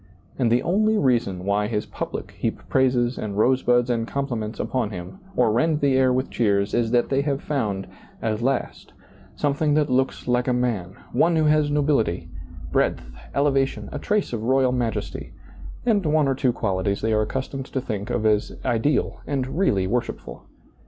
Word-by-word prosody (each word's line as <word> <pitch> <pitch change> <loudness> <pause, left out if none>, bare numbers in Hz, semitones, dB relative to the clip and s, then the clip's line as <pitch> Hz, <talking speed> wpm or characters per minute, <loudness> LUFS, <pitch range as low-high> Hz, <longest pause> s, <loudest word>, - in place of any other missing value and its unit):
And 120 -3 +2
the 120 - +3
only 215 +5 +2
reason 115 - +1
why 100 +1 +1
his 105 -2 -2
public - - -5
heap - - -4
praises 125 -2 +2
and 100 -2 -4
rosebuds 125 +1 +3
and 115 -2 -1
compliments 120 -6 -3
upon 125 -5 -1
him 90 - -8 0.2
or 120 -3 +3
rend 150 +7 +2
the 140 -2 +2
air 130 -1 +4
with 130 +1 -1
cheers 100 -3 +1
is 120 -1 +1
that 120 0 +2
they 135 0 +2
have 140 -1 -1
found, 105 -11 -2 0.3
at 110 0 -2
last, 135 +3 -2 0.4
something 145 +1 +1
that 150 -3 +2
looks 130 +1 0
like 125 0 +1
a 125 - +2
man, 110 -7 -1 0.2
one 170 0 +3
who 160 - +3
has 150 -1 +3
nobility, 140 - +1 0.4
breadth, 60 - 0 0.2
elevation, 135 -7 +1
a - - -4
trace 210 -9 0
of 115 - -2
royal 130 +2 +3
majesty, 120 -3 -3 0.5
and 215 -5 +3
one 150 -1 +3
or 135 - +2
two 130 -1 +1
qualities 100 -2 -1
they 110 0 +1
are 110 - +3
accustomed 135 +4 -3
to 135 - -2
think 105 -5 -4
of 110 - -1
as 105 -1 +1
ideal 125 +5 0
and 135 -2 -2
really 100 - +2
worshipful. 120 +5 -4
125 Hz, 175 wpm, -24 LUFS, 110-140 Hz, 0.5 s, air